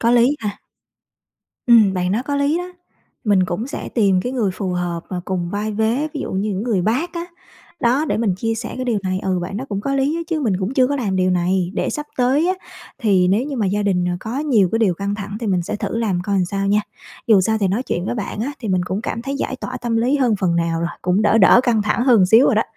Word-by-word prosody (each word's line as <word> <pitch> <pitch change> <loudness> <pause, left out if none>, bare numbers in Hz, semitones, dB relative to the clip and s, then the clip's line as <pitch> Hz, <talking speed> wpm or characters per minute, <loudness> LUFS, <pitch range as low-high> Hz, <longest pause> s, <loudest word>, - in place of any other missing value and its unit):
có 235 - +2
lý 245 +4 +4
ha. 210 -2 -4 1.1
Ừm, 220 -5 +6
bạn 180 +1 0
nói 230 +4 0
có 285 0 -2
lý 285 +4 +1
đó. 355 - -3 0.6
Mình 195 -3 +3
cũng 185 +7 -3
sẽ 280 - -6
tìm 195 -5 +2
cái 250 - -3
người 225 -7 0
phù 190 -1 -3
hợp 175 -1 -2
và 180 -2 -4
cùng 180 -2 -2
vai 210 +2 -2
vế, 230 +8 0
ví 290 - -3
dụ - - -4
như 200 +3 -1
những 195 +1 -2
người 215 -7 0
bác 265 - 0
á, 340 0 -3 0.6
đó 255 +6 +2
để - - -1
mình 215 -5 +1
chia 225 +4 -2
sẻ 230 +1 -5
cái 255 - -3
điều 230 -4 0
này, 185 0 -1
ừ, 185 -1 -1
bạn 195 +3 -5
đó 255 - -4
cũng 200 -1 -3
có 275 +4 -2
lý 275 +4 +1
á 335 - -2
chứ 325 -2 -1
mình 220 -8 +1
cũng 200 +7 -3
chưa 255 -1 +4
có 285 +1 -1
làm 200 -7 -1
điều 185 0 +2
này. 180 0 +1
Để - - -1
sắp 295 0 -4
tới 270 +7 +2
á 375 - +2 0.4
thì 195 -7 +3
nếu 220 +8 +1
như 280 -3 -4
mà 210 -4 0
gia 205 +2 0
đình, 185 -3 +1
ờ, 180 - 0
có 230 +5 -4
nhiều 240 - +3
cái 225 - +2
điều 195 -6 +2
căng 200 +2 -3
thẳng 205 0 -6
thì 230 - -3
mình 185 -3 +1
sẽ 210 - -4
thử 225 - -3
làm 195 -6 0
coi 200 +1 -2
làm 185 - +2
sao 195 +2 -2
nha. 205 +1 +3 0.5
Dù 215 -5 +6
sao 220 +3 +1
thì 195 - +2
nói 215 +7 0
chuyện 175 -7 -3
với - - -2
bạn 210 -2 -4
á 280 +5 -2
thì 220 - -5
mình 185 -1 +1
cũng 190 +3 -3
cảm 230 - -4
thấy 275 +1 -3
giải 265 - -3
tỏa 255 0 -6
tâm 235 -2 -2
lý 250 +5 +2
hơn 245 -6 +2
phần 170 -3 +1
nào 165 -1 0
rồi, 170 - -1
cũng 185 +4 +1
đỡ 215 +1 +4
đỡ 225 +4 +7
căng 230 -4 +2
thẳng 210 +3 0
hơn 230 -8 +5
xíu 225 +7 +6
rồi - - +3
đó. - - +3
215 Hz, 280 wpm, -20 LUFS, 190-250 Hz, 1.1 s, đỡ